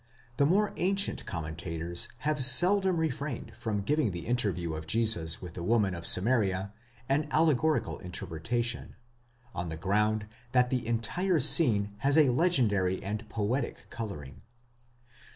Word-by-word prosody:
* 120 0 -31
the 140 - +3
more 205 +5 +1
ancient 195 +2 +1
commentators 85 +1 -1 0.2
have 150 -2 +1
seldom 180 +8 +6
refrained 145 -4 -3
from 105 -3 -3
giving 150 +1 +1
the 85 -2 -6
interview 100 -9 -1
of 80 0 -7
Jesus 95 -6 0
with 90 -2 -8
the 85 - -7
woman 100 0 +1
of 85 -1 -1
Samaria 100 -2 +2 0.3
an 145 +3 0
allegorical 155 -1 +1
interpretation, 115 +7 -4 0.6
on 85 - -4
the 80 - -6
ground 105 +4 0 0.3
that 125 -1 +3
the 125 -3 -2
entire 155 +11 0
scene 105 -8 +3
has 140 +5 +1
a 145 -5 +5
legendary 115 - +1
and 105 +3 -5
poetic 115 +5 -3
colouring. 90 - -7
115 Hz, 135 wpm, -29 LUFS, 95-140 Hz, 0.6 s, seldom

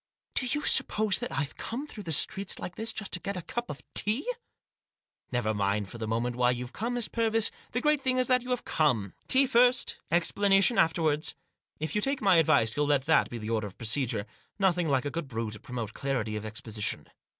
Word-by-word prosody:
" - - -57
Do 255 - 0
you 295 +4 -1
suppose 210 -3 +3
that - - -4
I've 140 +2 -2
come 250 +6 -4
through 210 -9 -10
the 165 - -3
streets 195 +6 +2
like 180 - -7
this 225 +1 -1
just 215 - -6
to 180 - +1
get 200 +1 -4
a 180 - -5
cup 240 +6 -4
of 145 - -7
tea? 220 - +1 0.6
" - - -52
"Never 120 -3 0
mind 100 -1 -1
for 115 - -10
the 110 - -4
moment 120 +2 -1
why 125 0 +3
you've 125 0 -3
come, 235 +3 -3
Miss 240 -3 -1
Purvis; 225 -1 +1 0.2
the 245 - -1
great 300 0 +2
thing 255 -1 +1
is 255 - +1
that 255 -1 +3
you 250 - -9
have 250 -1 -2
come. 120 -11 +1
Tea 270 +1 +5
first: 250 0 +3
explanation 195 +6 +3
afterwards. 160 -2 +1 0.4
If 155 0 -3
you 210 - +1
take 275 +4 +1
my 195 -4 +4
advice 145 -9 +3
you'll 145 0 +1
let 140 -2 +2
that 160 - +3
be 120 - -6
the 110 0 -5
order 110 -2 -1
of 95 - -13
procedure. 115 -2 0 0.3
Nothing 180 -4 +2
like 135 -2 +1
a 145 - -2
good 170 -3 -4
brew 115 -3 -4
to 105 - -8
promote 115 -2 -6
clarity 125 -6 -2
of 105 0 -5
ex 110 +1 -5
position." 105 -2 +1
160 Hz, 230 wpm, -28 LUFS, -, 0.6 s, Tea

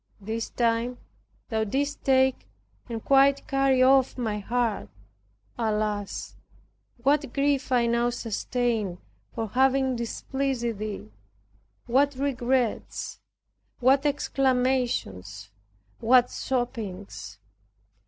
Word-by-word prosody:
This 220 +3 -4
time 235 +1 0 0.5
thou 220 -2 0
didst 280 +7 -2
take 265 -1 +2 0.4
and 225 -2 -5
quite 275 0 +4
carried 270 -2 +3
off 265 0 +4
my 220 -4 -2
heart. 230 +1 -1 0.7
Alas, 210 -2 -2 0.7
what 280 -1 +2
grief 280 -1 +1
I 245 -2 +4
now 235 +1 +2
sustained 230 -4 -2 0.4
for 225 -1 -3
having 265 +2 +2
displeased 240 -1 -2
Thee! 210 - -5 0.7
what 275 +3 +2
regrets, 255 -3 -1 0.6
what 270 +3 +4
exclamations, 250 - 0 0.5
what 245 +1 +4
sobbings! 225 -7 -4
245 Hz, 90 wpm, -26 LUFS, 225-265 Hz, 0.7 s, quite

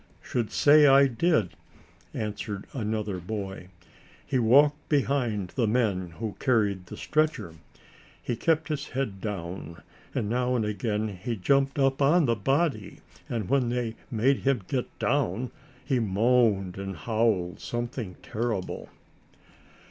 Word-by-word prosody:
"Should 120 -4 -2
say 150 0 +6
I 140 0 +7
did," 130 - +1 0.6
answered 105 -2 -4
another 105 -5 -2
boy; 95 0 -5 0.6
"he 130 - 0
walked 145 +6 +4
behind 125 - 0
the 120 +1 0
men 100 -7 0
who 110 +2 -4
carried 105 -8 +1
the - - -9
stretcher. 155 - 0 0.7
He 120 - -3
kept 160 +5 +1
his 150 -2 -3
head 125 -8 -3
down, 90 -5 -6 0.3
and 105 - 0
now 125 +3 0
and 115 -3 +1
again 105 0 -1
he 100 +5 -4
jumped 135 +7 +1
up 135 0 +2
on 155 +4 +5
the 115 -2 +2
body, 135 - 0 0.3
and 110 -5 -2
when 130 -3 +2
they 120 -2 -1 0.2
made 125 +4 +2
him 135 -6 +1
get 130 -3 -1
down 125 -4 0 0.3
he 135 -4 +1
moaned 105 -3 +2
and 95 -1 -5
howled 110 -1 0
something 120 -5 -4
terrible." 110 -4 -3
115 Hz, 135 wpm, -27 LUFS, 100-135 Hz, 0.7 s, I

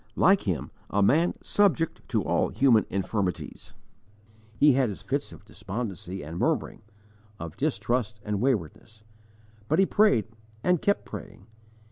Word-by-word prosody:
Like 195 - +4
him, 85 -8 -2 0.2
a 100 0 +2
man 160 - +3
subject 185 -6 +1
to - - +1
all - - +1
human 120 -6 +3
infirmities, 95 -1 -3 0.8
he 145 -1 +6
had 130 -2 +2
his 100 - -8
fits - - -2
of - - -14
despondency 95 -4 -6
and 80 +3 -6
murmuring, - - -1 0.6
of 85 -1 -7
distrust 120 -6 -1
and 105 -1 -2
waywardness; 110 - -2 0.6
but 155 - +2
he 195 - +5
prayed 195 - +3 0.4
and 180 -3 +2
kept 200 - +1
praying. 105 -2 -9
115 Hz, 135 wpm, -27 LUFS, 100-150 Hz, 0.8 s, he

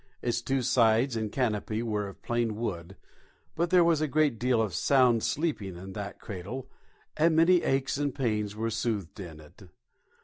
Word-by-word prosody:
Its 120 -1 0
two 135 +1 -1
sides 115 +1 +3
and 110 -2 -2
canopy 110 -3 -1
were 105 -3 -2
of 100 - -12
plain 120 -2 -1
wood, 95 -5 -4 0.6
but 170 +1 0
there 180 -1 +5
was 165 -2 +3
a 155 - +1
great 145 -5 +1
deal 125 -1 +2
of 110 -4 0
sound 125 -4 +3
sleeping 135 - -2
in 95 +2 -9
that 100 -1 -6
cradle, 105 +7 -7 0.5
and 160 +1 +3
many 170 +2 +5
aches 135 0 0
and 145 -2 -1
pains 105 -6 -1
were 115 +1 -2
soothed 110 -5 -3
in 85 -5 -8
it. 75 -1 -16
115 Hz, 175 wpm, -28 LUFS, 105-135 Hz, 0.6 s, there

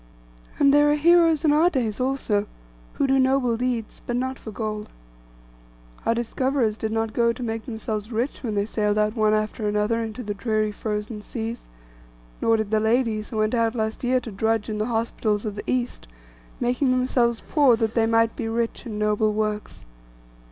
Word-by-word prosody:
And 280 0 +5
there 295 0 +5
are 295 - +4
heroes 330 0 +4
in 295 - +5
our 320 +4 +5
days 240 - -2
also, 250 -6 0 0.5
who - - 0
do 270 0 +3
noble 260 -2 +2
deeds, 240 -2 -3
but 240 - -1
not 260 +1 -2
for - - -9
gold. 215 -1 -4 1.2
Our 230 - +3
discoverers 240 -1 0
did 220 0 -3
not 225 0 -1
go 235 0 +3
to 235 +2 -6
make 225 -1 -3
themselves 220 -2 -4
rich 240 +5 -2
when 220 -5 -3
they 200 0 +1
sailed 210 -1 0
out 210 +1 +1
one 215 -1 +3
after 215 0 -2
another 210 +2 +1
into 225 +2 -5
the 205 -1 -3
dreary 215 0 0
frozen 210 +1 -4
seas; 230 +1 -5 0.8
nor 225 0 +3
did 220 -1 -3
the 220 - +3
ladies 220 -1 +1
who 220 - -5
went 215 +1 +1
out 230 -1 +1
last 220 0 -2
year 255 +1 +2
to 230 - -7
drudge 220 +2 0
in 210 - -3
the 215 - 0
hospitals 225 -2 -1
of 210 - -2
the 205 - -7
East, 250 - -2 0.5
making 250 +3 +1
themselves 250 -2 +1
poor, 285 -6 +5
that 225 -1 -1
they 225 -1 +2
might 225 0 +2
be 225 - -3
rich 230 +1 -2
in 215 -2 -5
noble 210 0 +2
works. 210 - -3
225 Hz, 190 wpm, -24 LUFS, 215-250 Hz, 1.2 s, And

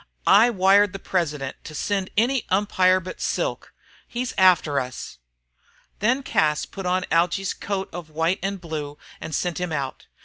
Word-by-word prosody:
"I 225 +4 +6
wired 200 -1 +4
the - - -4
president 150 -8 -2
to 155 - -8
send 195 +3 -1
any 245 +3 +2
umpire 185 -1 +3
but 185 0 -8
Silk. - - -2 0.4
He's 245 0 -4
after 175 -6 +4
us!" 125 - -7 0.8
Then 255 +6 +1
Cas 150 - +1
put 195 -2 -7
on 180 0 +1
Algy's 180 +4 +1
coat 195 -1 -3
of 170 -2 -7
white 165 +4 0
and 195 +1 -3
blue 150 -4 -6 0.2
and 160 -1 -5
sent 175 0 -1
him 180 -2 -3
out. 140 -3 -4
185 Hz, 160 wpm, -24 LUFS, 160-200 Hz, 0.8 s, I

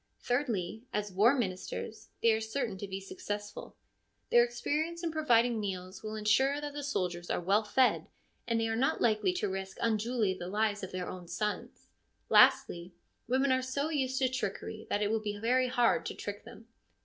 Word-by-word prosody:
Thirdly, 225 -6 -1
as 210 -1 -2
war 215 +8 +5
ministers, 215 +1 -4
they 230 - +6
are 220 0 +1
certain 220 0 -2
to 200 - -5
be 190 0 -4
successful; 205 +1 -6 0.6
their 240 - +7
experience 305 +8 -2
in 335 - -1
providing 245 -7 +3
meals 185 -2 -5
will 215 0 -5
ensure 265 +7 +2
that 295 -1 -5
the 290 - -4
soldiers 180 -11 -2
are - - 0
well 195 +5 +2
fed, 250 +4 +2 0.4
and 230 -1 +1
they 225 - +1
are 225 - -1
not 260 +4 +1
likely 220 - +2
to 360 - -1
risk 190 0 -5
unduly 225 -2 +1
the 180 -1 -7
lives 210 +1 0
of 190 - -6
their 185 -1 -4
own 180 -2 -7
sons. 205 +5 -4 0.4
Lastly, 175 +1 +4 0.3
women 260 +2 +2
are 260 0 +3
so 280 +4 -2
used 265 -4 -1
to 260 - +3
trickery 220 -3 -4
that 205 - +1
it 205 - 0
will 225 - +1
be 205 -1 -3
very 250 +4 +2
hard 245 -1 +2
to - - -5
trick 205 0 -6
them. 230 - -13
220 Hz, 185 wpm, -31 LUFS, 200-255 Hz, 0.6 s, their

